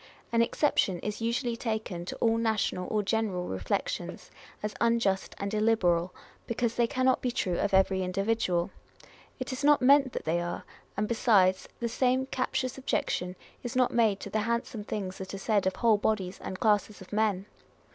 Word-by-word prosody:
An 230 0 +3
exception 230 - +2
is 210 +1 -4
usually 235 +1 0
taken 220 -7 -3
to - - -5
all 225 0 +2
national 220 -5 0
or 210 -1 +1
general 200 -4 -1
reflections, 95 -2 -3 0.3
as 210 0 -2
unjust 230 -5 +1
and 200 +1 -4
illiberal, 185 -5 +2 0.4
because 235 0 0
they 235 0 +2
cannot 255 0 +2
be 250 - 0
true 185 -7 -1
of 205 - 0
every 190 0 +3
individual. 185 -1 0 0.7
It 255 0 -4
is 260 +3 -5
not 295 0 +6
meant 275 0 +5
that - - -5
they 170 +2 +1
are; 175 0 -4 0.3
and 210 +1 0
besides, 200 -5 +3
the 235 - -1
same 255 +2 +1
captious 260 0 -2
objection 180 -8 -1 0.3
is 245 -1 -5
not 255 -1 +3
made 220 -4 +3
to - - -7
the 215 - +1
handsome 235 0 -2
things 195 -3 -4
that 190 +1 -6
are - - -5
said 200 -1 +1
of 190 - 0
whole 230 -3 +4
bodies 200 -3 -1
and 185 - -6
classes 210 -2 +1
of 190 - -12
men. 205 -3 +1
215 Hz, 175 wpm, -29 LUFS, 190-235 Hz, 0.7 s, not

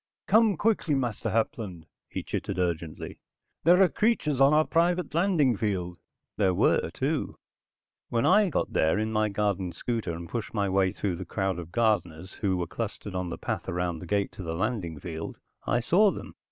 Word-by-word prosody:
"Come 215 -2 +4
quickly, 205 -8 +1
Master 120 -5 -1
Hapland," 105 -6 -2 0.2
he - - -4
chittered - - -4
urgently. 85 -3 -3 0.5
"There 180 +3 +7
are - - +6
creatures 155 - +1
on 135 +1 +7
our 155 +1 +4
private 175 +1 +1
landing 165 - +3
field." 90 -5 -2 0.4
There 95 -3 +2
were, - - +3
too. - - -2 0.7
When 115 -1 +1
I 205 +1 +5
got - - -1
there 80 +5 +3
in 110 +1 -1
my 110 0 +2
garden 100 -3 -1
scooter, 115 -8 -3
and 85 +1 -7
pushed 115 +2 -5
my 100 -2 +1
way 95 -1 +2
through 95 -3 -2
the 95 - -5
crowd 95 0 -2
of 85 -1 -8
gardeners 95 -6 0
who 95 -3 +1
were 90 - -1
clustered 105 +1 -5
on 90 -1 -2
the 85 - -5
path - - -4
and 85 - -3
around 90 -2 -1
the 90 - -9
gate 100 +2 0
to - - -9
the 80 -2 -4
landing 95 -5 -2
field, 80 -2 -6 0.3
I 120 - +2
saw 195 - +4
them. - - -6
105 Hz, 190 wpm, -27 LUFS, 90-140 Hz, 0.7 s, There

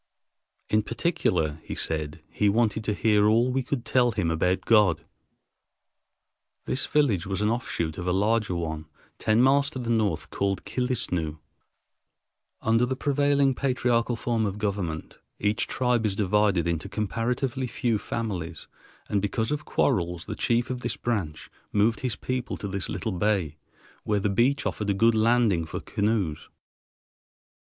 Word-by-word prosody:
In 110 - +3
particular, 90 - -1
he - - -6
said, 80 0 -3
he 105 - +2
wanted 110 0 +1
to 105 - 0
hear 105 -1 +3
all 115 +4 +3
we 135 +1 +1
could 125 -1 -3
tell 120 -2 +3
him 85 -5 0
about 90 +3 +1
God. 95 -8 +4 1.6
This 130 - 0
village 110 - +2
was 95 0 -2
an 105 - +2
offshoot 85 -10 -2
of 90 - -4
a - - +2
larger 105 0 +1
one, 80 -2 -4 0.3
ten 110 +2 +3
miles 140 +1 +4
to 145 - -8
the 120 -2 -2
north, 100 -9 0
called 100 -1 -1
Killisnoo. 100 -9 -1 1.3
Under 115 +2 +3
the 130 - -1
prevailing 140 0 +2
patriarchal 125 -3 +1
form 115 -2 0
of 100 0 -4
government 95 -7 -3 0.2
each 105 +1 0
tribe 125 -2 +1
is 100 - -2
divided 100 -3 +2
into 85 -2 -2
comparatively 120 +4 -2
few 115 -3 0
families; 90 -9 -4 0.4
and 100 - 0
because 110 +4 -1
of 150 0 -2
quarrels, 90 - 0
the - - -4
chief 120 +2 0
of 125 -1 -4
this - - -2
branch 95 -10 -3 0.2
moved 110 +2 +2
his 125 -4 -2
people 130 -1 -3
to 100 - -5
this 100 -1 -3
little 110 - -3
bay, 95 -5 0 0.5
where 105 -1 +1
the 100 0 0
beach 135 +7 +2
offered 105 -1 -2
a 100 - +2
good 115 +3 +4
landing 110 -5 +3
for 80 - -5
canoes. 100 -7 -1
105 Hz, 155 wpm, -26 LUFS, 90-120 Hz, 1.6 s, God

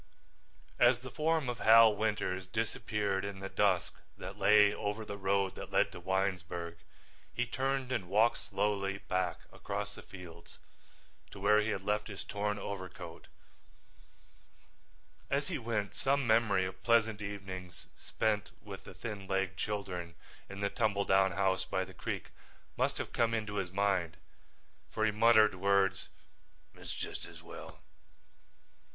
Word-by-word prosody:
As 120 0 +6
the 130 0 -8
form 155 +1 +1
of 120 -2 -3
Hal 110 -1 +8
Winters 100 -3 -1
disappeared 105 -1 -1
in 100 -1 -5
the 95 0 -5
dusk 95 -4 +2 0.2
that - - -7
lay 105 -1 +6
over 105 +2 -3
the 100 - -5
road 100 -1 +1
that - - -8
led - - +3
to - - -9
Winesburg, 90 -2 -2 0.5
he 125 - -1
turned 130 +1 -1
and 110 -8 -2
walked 110 +4 +4
slowly 100 -1 -1
back 90 -3 -2
across - - -4
the - - -10
fields 90 -3 -12 0.7
to 100 - -11
where 105 +2 +5
he 105 - -1
had 95 -3 -2
left 105 +1 0
his 100 -3 -7
torn 105 0 -2
overcoat. 95 -4 -7 2.0
As 140 +1 0
he 165 -6 -2
went 110 -4 -2
some 140 0 +1
memory 110 -4 +3
of 95 - -7
pleasant 110 -2 +3
evenings 95 -3 -7
spent 105 -1 -1
with - - -9
the - - -10
thin 105 -4 -6
legged 95 -1 0
children 90 -5 -4 0.3
in 100 +1 -7
the 100 - +1
tumble 105 -4 +1
down 95 -1 +4
house 95 0 +1
by 95 0 -1
the - - -13
creek - - -5 0.4
must - - 0
have - - -5
come 115 -1 +2
into 105 -2 -3
his 90 -3 -2
mind, 95 -5 +1 0.7
for 110 - 0
he 110 - +3
muttered 110 -1 +6
words. 100 +1 +2 0.6
"It's - - -9
just - - -5
as - - -13
well. - - -10
100 Hz, 150 wpm, -33 LUFS, 95-110 Hz, 2.0 s, Hal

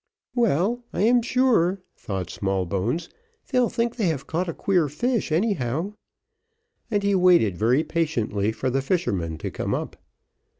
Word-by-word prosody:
"Well, 235 - +1
I 175 - -1
am 240 +2 +5
sure," 225 -7 +2
thought 95 -3 -5
Smallbones, 95 - -1 0.4
"they'll 250 -3 +3
think 235 +1 -1
they 215 -6 +1
have 155 -4 -2
caught 175 +2 -2
a - - -2
queer 180 -6 +2
fish 230 - -1
anyhow:" 165 - 0 1.0
and 205 -3 0
he 200 0 +2
waited 180 - +4
very 120 - +2
patiently 115 -12 -1
for 120 +4 -2
the 135 +2 +1
fisherman 100 - -1
to - - -5
come - - -2
up. - - -5
170 Hz, 145 wpm, -24 LUFS, -, 1.0 s, am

